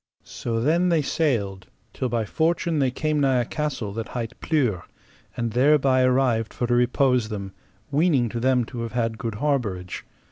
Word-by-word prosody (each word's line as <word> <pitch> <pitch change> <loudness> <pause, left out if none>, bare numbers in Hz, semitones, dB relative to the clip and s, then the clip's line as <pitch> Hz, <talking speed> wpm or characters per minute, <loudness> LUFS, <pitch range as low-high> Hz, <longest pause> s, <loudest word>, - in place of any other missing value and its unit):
So 115 -1 -3
then 165 +8 +2
they 165 -3 +2
sailed 105 - -1 0.3
till 130 - -2
by 115 -2 -1
fortune 165 - 0
they 135 -2 +3
came 155 +4 -1
nigh 135 -3 +3
a - - -2
castle 130 -9 -3
that 115 +1 -4
hight 115 -3 -5
Pluere, 125 - +1 0.6
and 115 -1 -1
thereby 130 +1 +4
arrived 125 -3 +2
for 120 - -1
to 120 - 0
repose 125 -1 +2
them, 100 -3 -5 0.4
weening 145 -4 +3
to 120 - -4
them 125 0 +2
to 120 0 -7
have 115 -1 -5
had 115 -2 -1
good 115 -3 -3
harbourage. 105 -9 -2
125 Hz, 175 wpm, -24 LUFS, 115-145 Hz, 0.6 s, thereby